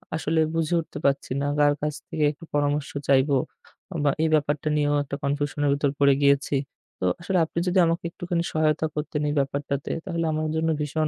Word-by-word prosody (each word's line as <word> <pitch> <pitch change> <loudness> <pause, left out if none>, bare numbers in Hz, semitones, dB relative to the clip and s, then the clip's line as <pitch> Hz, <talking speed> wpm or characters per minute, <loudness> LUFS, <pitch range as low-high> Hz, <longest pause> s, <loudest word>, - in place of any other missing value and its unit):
আসলে 160 0 0 0.2
বুঝে 165 +1 0
উঠতে 160 - -10
পারছি 140 -1 +1
না। - - 0
কার 145 0 +5
কাছ 150 0 -1
থেকে 155 - -2
একটু 150 - -15
পরামর্শ 145 0 0 0.2
চাইব? 135 +1 +4 0.7
বা 145 - +4
এই 160 - +2
ব্যাপারটা 150 0 0
নিয়েও 145 0 +2
একটা 140 0 -5
confusion 145 +1 -1
এর - - +3
ভিতর 140 0 +1
পড়ে 140 -1 +6
গিয়েছি। 140 0 +3 0.4
তো - - -1 0.2
আসলে 185 +1 0
আপনি 165 - -4
যদি 185 +1 +3
আমাকে 165 +1 -1
একটুখানি 175 0 -2
সহায়তা 155 0 +2
করতেন 150 0 -2
এই - - -1
ব্যাপারটাতে 140 0 -2
তাহলে 170 -3 -2
আমার 155 0 -1
জন্য 160 0 +1
ভীষণ 155 +1 0
150 Hz, 190 wpm, -25 LUFS, 140-160 Hz, 0.7 s, পড়ে